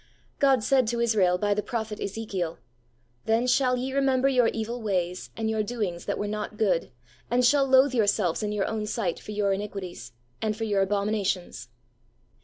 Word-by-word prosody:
God 270 -5 +4
said 260 +1 +3
to 235 +1 -1
Israel 205 -6 +3
by 205 +2 +1
the 210 - -1
Prophet 220 -2 -4
Ezekiel, 195 -5 -3 0.3
' 120 0 -40
Then 225 +2 +2
shall 250 0 +3
ye 260 +2 -3
remember 270 -1 +2
your 250 -3 +4
evil 230 +2 -3
ways, 180 -4 -2
and 225 -1 -1
your 220 -1 0
doings 205 -6 -3
that 200 - -2
were 205 - -2
not 210 0 -4
good, 190 -6 +1 0.4
and 245 +1 +3
shall 275 +1 +4
loathe 265 +1 +5
yourselves 205 -6 +1
in 210 -1 -2
your 210 -2 0
own 215 -1 -3
sight 210 -6 -2
for - - -14
your 205 -1 +1
iniquities, 190 - -6 0.3
and 215 -1 -1
for 225 - -3
your 205 -3 +1
abominations. 200 - -1
215 Hz, 185 wpm, -26 LUFS, 195-240 Hz, 0.4 s, loathe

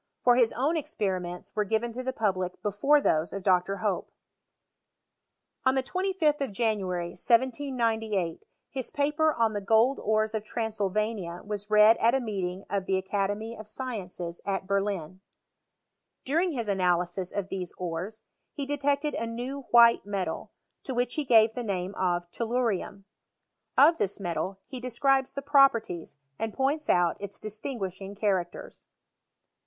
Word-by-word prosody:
For 245 -1 +6
his 240 -2 +4
own 275 +7 +1
experi 220 - -1
ments 175 0 -8
were 210 - +2
given 220 +3 -1
to 245 +3 -5
the 260 0 -2
public 185 -6 -1
before 210 +9 +3
those 160 - +1
of 195 - -5
Dr. 185 +1 +2
Hope. 200 -3 -1 1.5
On 260 0 +3
the 265 - +1
25th 365 -3 0
of 275 - -1
January, 190 -5 -1
1798, 230 - 0 0.3
his 260 -2 -4
paper 300 +2 +2
on 225 -5 +1
the 205 - -2
gold 225 +6 +3
ores 215 0 +1
of 215 -1 -2
Transylvania 215 -4 -2
was 205 0 -4
read 215 +1 +7
at 235 +3 +3
a - - +2
meeting 195 -5 -3
of 195 -2 -2
the 190 - +2
Academy 205 +4 -2
of 215 -1 -10
Sciences 195 -8 -6
at 195 -1 -2
Berlin. 195 -3 -2 1.0
During 330 +6 +1
his 235 -5 -3
analysis 180 -1 0
of 195 -1 -3
these 185 -2 -4
ores, 180 +5 -5 0.3
he 285 -3 -4
detected 285 +1 0
a 230 - -2
new 250 +4 -5
white 235 -1 +7
metal, 200 -2 -3 0.3
to 260 - -5
which 245 0 0
he 305 - -1
gave 225 -4 +5
the 245 - -4
name 190 -3 -2
of 175 -2 0
tellurium. 225 -4 -1 0.7
Of 325 +3 +6
this 200 +1 -1
metal 190 +1 -3
he 260 - -7
describes 260 +2 +1
the 280 - -5
properties, 230 - +3 0.2
and 225 -1 -3
points 285 +3 0
out 175 -2 +3
its 200 -1 -6
distinguishing 200 -3 -5
characters. 190 -4 -2
215 Hz, 150 wpm, -28 LUFS, 190-255 Hz, 1.5 s, read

